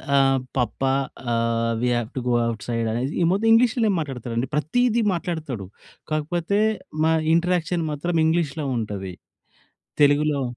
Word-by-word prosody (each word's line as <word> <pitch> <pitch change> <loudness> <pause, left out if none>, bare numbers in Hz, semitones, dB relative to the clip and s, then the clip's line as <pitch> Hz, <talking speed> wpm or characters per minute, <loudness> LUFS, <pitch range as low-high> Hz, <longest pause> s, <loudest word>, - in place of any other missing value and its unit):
ఆ! - - +5 0.4
పప్పా! 130 +1 0 0.4
ఆహ్, 115 0 +1
we 125 - +1
have 120 -1 -2
to - - -1
go 125 - +2
outside 115 +1 -2
అనేది 125 +6 -2
ఈ - - +4
మొత్తం 200 +4 +1
ఇంగ్లీష్‌లోనే 225 -2 +4
మాట్లాడుతాడండి. 125 -4 -3
ప్రతిది 235 +10 +1
మాట్లాడుతాడు. 155 - -4 0.4
కాకపోతే 170 +6 0 0.5
మా 160 - +3 0.2
ఇంటరాక్షన్ 175 0 +1
మాత్రం 165 +3 -1
ఇంగ్లీష్‌లో 160 -2 0
ఉంటది. 100 -4 -4 0.9
తెలుగులో 145 0 +3
145 Hz, 125 wpm, -23 LUFS, 115-175 Hz, 0.9 s, ఆ